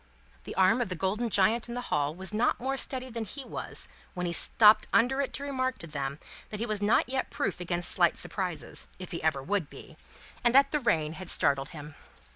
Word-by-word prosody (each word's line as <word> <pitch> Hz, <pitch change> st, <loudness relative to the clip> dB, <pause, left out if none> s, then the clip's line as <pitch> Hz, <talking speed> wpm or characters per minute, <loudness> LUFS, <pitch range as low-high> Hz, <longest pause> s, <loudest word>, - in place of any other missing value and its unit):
The -, -, -7 dB
arm 190 Hz, +6 st, +4 dB
of 235 Hz, -, -2 dB
the 185 Hz, -, -3 dB
golden 205 Hz, +7 st, -1 dB
giant 220 Hz, +4 st, +2 dB
in 235 Hz, -, -5 dB
the 245 Hz, -, -5 dB
hall 150 Hz, +1 st, 0 dB
was 190 Hz, +3 st, -3 dB
not 220 Hz, +3 st, +1 dB
more 265 Hz, +2 st, -2 dB
steady 260 Hz, -1 st, -1 dB
than 230 Hz, -1 st, -4 dB
he 260 Hz, +6 st, -8 dB
was, -, -, -2 dB, 0.3 s
when 180 Hz, 0 st, -3 dB
he 170 Hz, -, -2 dB
stopped 210 Hz, +5 st, +6 dB
under 265 Hz, +4 st, +3 dB
it 275 Hz, -, -3 dB
to 280 Hz, -, -3 dB
remark 260 Hz, -2 st, -2 dB
to -, -, -7 dB
them 140 Hz, -3 st, -4 dB, 0.3 s
that 210 Hz, -, -6 dB
he 230 Hz, -, -1 dB
was 215 Hz, -2 st, -2 dB
not 210 Hz, +3 st, +3 dB
yet 260 Hz, +1 st, -2 dB
proof -, -, -3 dB
against 175 Hz, -1 st, +2 dB
slight 175 Hz, -2 st, +3 dB
surprises 175 Hz, -, -2 dB
(if 185 Hz, -1 st, -9 dB
he 170 Hz, -, -4 dB
ever 155 Hz, -4 st, 0 dB
would 195 Hz, -2 st, -1 dB
be), -, -, -13 dB, 0.5 s
and 240 Hz, +1 st, +3 dB
that 275 Hz, 0 st, +6 dB
the 300 Hz, -, +1 dB
rain 160 Hz, -, 0 dB
had 185 Hz, +2 st, -8 dB
startled 140 Hz, -2 st, +1 dB
him. 150 Hz, -3 st, -10 dB
200 Hz, 225 wpm, -28 LUFS, 165-245 Hz, 0.5 s, stopped